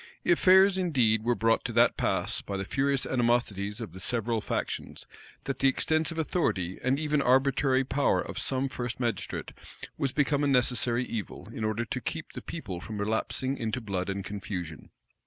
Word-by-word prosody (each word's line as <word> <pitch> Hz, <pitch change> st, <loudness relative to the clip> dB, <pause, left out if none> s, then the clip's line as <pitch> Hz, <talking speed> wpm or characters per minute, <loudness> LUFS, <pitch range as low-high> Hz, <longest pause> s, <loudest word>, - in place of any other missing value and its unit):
Affairs 190 Hz, +2 st, +5 dB
indeed 125 Hz, -, +3 dB
were 120 Hz, +1 st, +2 dB
brought 115 Hz, 0 st, +2 dB
to -, -, -3 dB
that -, -, +4 dB
pass, -, -, 0 dB
by 100 Hz, -, -5 dB
the 95 Hz, -, -3 dB
furious 135 Hz, +4 st, +1 dB
animosities 120 Hz, -4 st, 0 dB
of 110 Hz, -8 st, -7 dB
the 95 Hz, -, -9 dB
several 115 Hz, +2 st, 0 dB
factions, -, -, -4 dB, 0.4 s
that 135 Hz, -2 st, -4 dB
the 135 Hz, -, +4 dB
extensive 160 Hz, +4 st, +1 dB
authority 95 Hz, -, -1 dB
and 130 Hz, +2 st, +2 dB
even 150 Hz, -1 st, +1 dB
arbitrary 135 Hz, +1 st, +3 dB
power 135 Hz, +2 st, +1 dB
of -, -, -4 dB
some 135 Hz, 0 st, 0 dB
first 120 Hz, -2 st, -5 dB
magistrate 115 Hz, -6 st, -3 dB, 0.5 s
was 135 Hz, -, 0 dB
become 145 Hz, 0 st, +1 dB
a -, -, +2 dB
necessary 125 Hz, -2 st, +2 dB
evil, 110 Hz, -7 st, -6 dB
in 110 Hz, -, -4 dB
order 110 Hz, +2 st, -1 dB
to 125 Hz, -, -4 dB
keep 160 Hz, -1 st, -5 dB
the -, -, -7 dB
people 100 Hz, -, -6 dB
from 105 Hz, +2 st, -6 dB
relapsing 110 Hz, +5 st, -1 dB
into 115 Hz, +2 st, -2 dB
blood 100 Hz, -5 st, -3 dB
and 100 Hz, -1 st, -3 dB
confusion. 90 Hz, -6 st, -6 dB
125 Hz, 175 wpm, -28 LUFS, 105-140 Hz, 0.5 s, Affairs